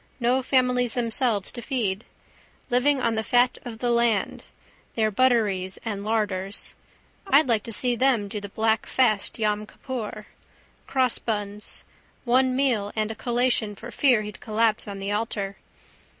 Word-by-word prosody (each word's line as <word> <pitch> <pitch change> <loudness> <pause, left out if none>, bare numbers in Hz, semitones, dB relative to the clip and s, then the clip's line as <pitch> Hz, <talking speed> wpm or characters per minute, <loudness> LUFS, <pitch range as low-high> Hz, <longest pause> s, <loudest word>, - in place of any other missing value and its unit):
No 250 +2 +2
families 250 -2 +1
themselves 230 -4 +1
to 240 - -7
feed. 225 -6 -2 0.7
Living 265 +3 +3
on 230 -2 +1
the 220 - 0
fat 245 +2 +2
of 235 -2 -7
the 240 +1 0
land. 235 -4 +1 0.5
Their 220 -1 +1
butteries 205 -6 +1
and 205 -3 -3
larders. 205 -3 -2 0.5
I'd 285 -2 +5
like 230 -3 +2
to 230 - -6
see 245 +2 +4
them 235 -4 +2
do 210 0 -5
the 205 - -7
black 220 +1 0
fast 220 -6 +1
Yom 210 -1 -1
Kippur. 220 -5 -6 0.6
Crossbuns. 215 -5 0 0.4
One 255 +1 +3
meal 240 -7 +1
and 215 0 -1
a - - -6
collation 240 -2 0
for 235 +4 -9
fear 245 -6 +3
he'd 210 -1 -8
collapse 220 0 0
on 200 -1 -6
the 195 +1 -4
altar. 205 -2 -2
225 Hz, 150 wpm, -25 LUFS, 210-250 Hz, 0.7 s, I'd